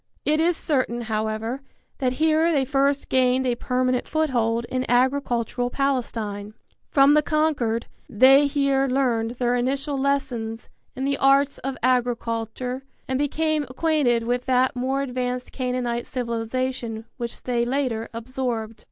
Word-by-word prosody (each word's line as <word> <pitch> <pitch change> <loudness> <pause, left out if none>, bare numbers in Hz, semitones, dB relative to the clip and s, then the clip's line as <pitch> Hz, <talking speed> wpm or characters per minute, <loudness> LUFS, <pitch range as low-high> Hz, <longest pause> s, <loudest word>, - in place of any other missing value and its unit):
It 305 +1 +2
is 335 +1 +2
certain, 255 -5 0
however, 220 +3 -2 0.4
that 255 -2 +1
here 315 +3 +3
they 280 -4 +2
first 275 +1 +1
gained 255 0 +2
a 250 - +2
permanent 250 +1 0
foothold 235 -7 0
in 255 0 -1
agricultural 245 -1 +1
Palestine. 225 -6 -2 0.3
From 275 0 +5
the 300 - +5
conquered 295 -8 0 0.2
they 270 +4 +6
here 275 -1 +1
learned 245 -3 0
their 245 0 +1
initial 270 +3 -1
lessons 240 -5 -2 0.3
in 265 +1 -3
the 280 0 0
arts 275 +1 +3
of 270 0 -4
agriculture 245 0 -1 0.3
and 260 0 -1
became 310 +2 0
acquainted 260 -4 +1
with 245 +2 -1
that 255 0 +2
more 265 +2 -1
advanced 250 -1 -3
Canaanite 250 -2 -2
civilization 235 -1 -3
which 235 -2 -6
they 240 -2 0
later 245 -3 -1
absorbed. 230 -2 -4
255 Hz, 135 wpm, -24 LUFS, 235-275 Hz, 0.4 s, they